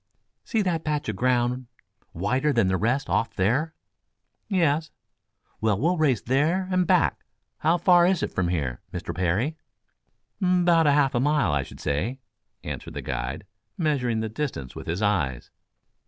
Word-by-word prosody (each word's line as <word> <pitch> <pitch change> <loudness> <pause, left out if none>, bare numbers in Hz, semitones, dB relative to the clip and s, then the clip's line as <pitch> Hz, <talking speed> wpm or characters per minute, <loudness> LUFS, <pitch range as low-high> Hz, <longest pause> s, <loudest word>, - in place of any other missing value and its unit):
"See 225 -3 0
that 170 -4 -1
patch 150 -5 -2
of 110 - -2
ground 125 +2 0 0.4
whiter 130 - 0
than 115 -6 +3
the 95 - +2
rest 125 +8 0
off 115 - 0
there?" 130 +12 +1 0.7
"Yes." 160 -5 +1 0.7
"Well, 110 -3 +1
we'll 170 +6 +1
race 135 -9 +2
there 155 +9 +1
and 185 -1 +2
back. 75 - +2 0.4
How 165 +3 +3
far 175 0 +5
is 185 -2 +1
it - - -2
from 95 -2 0
here, 70 -8 -2
Mr. 85 -1 -5
Parry?" 95 - 0 0.8
"'Bout 175 -3 +4
half 145 -2 +3
a 120 - +1
mile, 145 - +2
I 70 -1 +1
should - - -11
say," 100 - -2 0.4
answered - - -6
the - - -5
guide, - - -4 0.3
measuring 130 -9 0
the 110 - -2
distance 110 - -4
with - - -8
his 85 +6 -2
eyes. 80 -12 0
130 Hz, 155 wpm, -25 LUFS, 100-160 Hz, 0.8 s, far